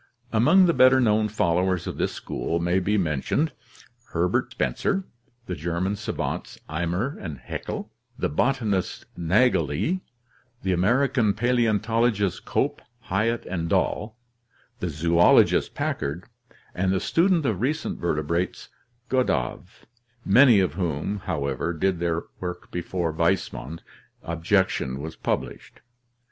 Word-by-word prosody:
Among 155 +12 +6
the 170 - +3
better 130 -1 +6
known 110 -3 +3
followers 90 -3 +1
of - - -5
this - - 0
school 85 - -3
may 85 +2 +1
be 105 +3 +1
men 75 -8 0
tioned 155 - 0 0.6
Herbert 85 +2 +1
Spencer, 190 - -1 0.4
the 95 - -4
German 85 +5 -2
savants 105 +2 -4
Eimer 90 - -2
and 80 -6 -5
Haeckel, 60 - -6 0.3
the - - 0
botanist 110 - 0
Naegeli, 125 - +1 0.6
the 95 -1 +1
American 120 +3 +2
paleontologists 115 -3 +1
Cope, - - -1 0.3
Hyatt, 110 +4 0
and 85 -3 -3
Dall, 110 +6 0 0.6
the 90 - -2
zoologist 85 +3 +4
Packard, 75 +6 -2 0.5
and 95 +1 0
the 95 - +1
student 170 - +2
of 105 -6 0
recent 150 +5 -1
verte 75 -3 -1
brates 85 +4 -2 0.4
Gadow, 125 - 0 0.6
many 120 +1 +7
of 90 -6 +1
whom, 85 +2 -2
however, 70 +3 -2
did 95 +2 0
their 85 -1 -1 0.2
work 90 -1 -6
before 85 -1 -2
Weismann's 75 0 -1 0.4
objection 85 -5 0
was 80 +2 -6
published. - - -4
95 Hz, 120 wpm, -25 LUFS, 85-115 Hz, 0.6 s, many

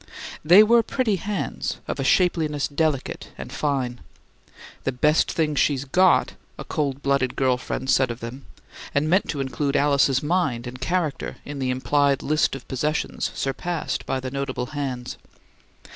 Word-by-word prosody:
They 180 +7 +8
were 235 +2 +5
pretty 225 -4 0
hands, 205 +3 -3
of - - -3
a - - 0
shapeliness 160 -6 +2
delicate 150 -2 -1
and - - -8
fine. 130 -5 -1 0.8
"The 135 - 0
best 150 +5 +2
things 150 -3 0
she's 140 -2 +1
got!" 180 +6 +3 0.2
a - - -6
cold 140 -2 -2
blooded 140 -2 +1
girl 130 -2 +2
friend 130 +1 -5
said 130 -1 +3
of 120 0 -5
them, 125 +4 -8 0.5
and 145 +2 +2
meant 185 +5 +2
to 150 - -2
include 135 +2 -1
Alice's 140 -2 +3
mind 150 -7 0
and 125 +1 -8
character 165 -1 -1
in 145 -1 -6
the 130 -1 -1
implied 140 +2 +1
list 155 -1 +1
of 135 - -10
possessions 150 +4 -1
surpassed 160 +5 -3
by 135 - -1
the 130 0 -5
notable 140 -2 -3
hands. 130 -4 -4
140 Hz, 160 wpm, -24 LUFS, 130-155 Hz, 0.8 s, They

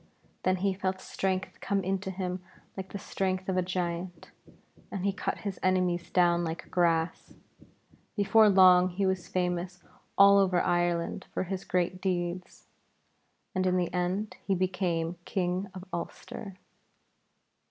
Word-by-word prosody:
Then 185 - +2
he 195 +1 0
felt 185 0 -2
strength 190 0 -3
come 200 -1 0
into 190 +1 -2
him 185 -1 -3 0.3
like 190 -1 -7
the - - -4
strength 185 -1 -2
of 190 - 0
a 185 - +3
giant, 175 -1 -4 0.6
and 195 -1 -4
he 200 - +2
cut - - -2
his 195 -2 -3
enemies 180 -2 +1
down 175 -1 +3
like 165 0 -5
grass. 165 -2 0 0.8
Before 215 +1 +5
long 185 -2 +7
he 190 +2 -1
was 190 -2 -1
famous 180 0 -2 0.3
all 200 0 +8
over 185 -2 +3
Ireland 175 -1 0
for - - 0
his 190 +1 -4
great 180 0 0
deeds, 180 -1 -3 0.9
and 185 0 +1
in 185 0 +2
the 175 -2 -1
end 185 +4 -1
he 195 - +1
became 180 -2 -1
King 185 +1 -1
of 185 0 -8
Ulster. 190 +3 -6
185 Hz, 140 wpm, -29 LUFS, 175-190 Hz, 0.9 s, all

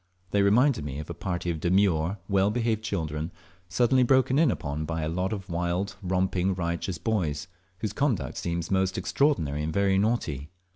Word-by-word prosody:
They 100 - +3
reminded 115 - +4
me 70 -2 -5
of 75 - -6
a - - -3
party 90 -1 -3
of 80 - -4
demure 85 -2 +3
and 100 +4 -4
well 100 0 +3
behaved 115 -1 0
children 80 -6 -3 0.4
suddenly 120 +8 +3
broken 130 +2 +4
in 160 -3 +5
upon 75 -7 -2
by 80 0 -3
a - - -1
lot 90 +4 -1
of 100 -2 -4
wild 90 +2 -2
romping, 95 0 0
riotous 85 0 -2
boys, 85 -5 -1 0.3
whose 110 - -2
conduct 135 - 0
seems 85 0 -3
most 95 0 +1
extraordinary 95 - +1
and 75 +1 -2
very 95 +2 +2
naughty. 80 - -1
95 Hz, 180 wpm, -27 LUFS, 80-105 Hz, 0.4 s, in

